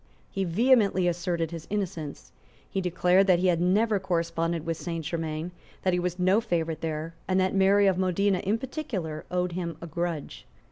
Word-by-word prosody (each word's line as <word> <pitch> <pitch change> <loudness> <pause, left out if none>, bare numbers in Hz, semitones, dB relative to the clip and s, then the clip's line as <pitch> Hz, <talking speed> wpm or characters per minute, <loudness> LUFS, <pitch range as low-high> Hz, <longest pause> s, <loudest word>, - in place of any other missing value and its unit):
He 195 -1 -1
vehemently 200 -1 +3
asserted 170 -1 -1
his 165 -1 -7
innocence. 170 - -4 0.4
He 195 - -2
declared 180 +2 +3
that 185 -2 +5
he 180 - 0
had 170 -1 +2
never 205 +4 +3
corresponded 170 -2 -1
with 165 0 -1
Saint 165 -2 -4
Germains, 160 +1 -3 0.3
that 185 - +2
he 180 - +2
was 180 0 -2
no 185 +4 +3
favourite 165 -7 -2
there, 160 0 -3
and 185 0 +2
that 185 0 +1
Mary 195 +1 +4
of 190 -2 +3
Modena 190 +1 +2
in 205 +4 0
particular 220 - -5
owed 180 0 0
him 170 -2 -4
a 170 - -7
grudge. 165 - -4
180 Hz, 180 wpm, -27 LUFS, 165-190 Hz, 0.4 s, that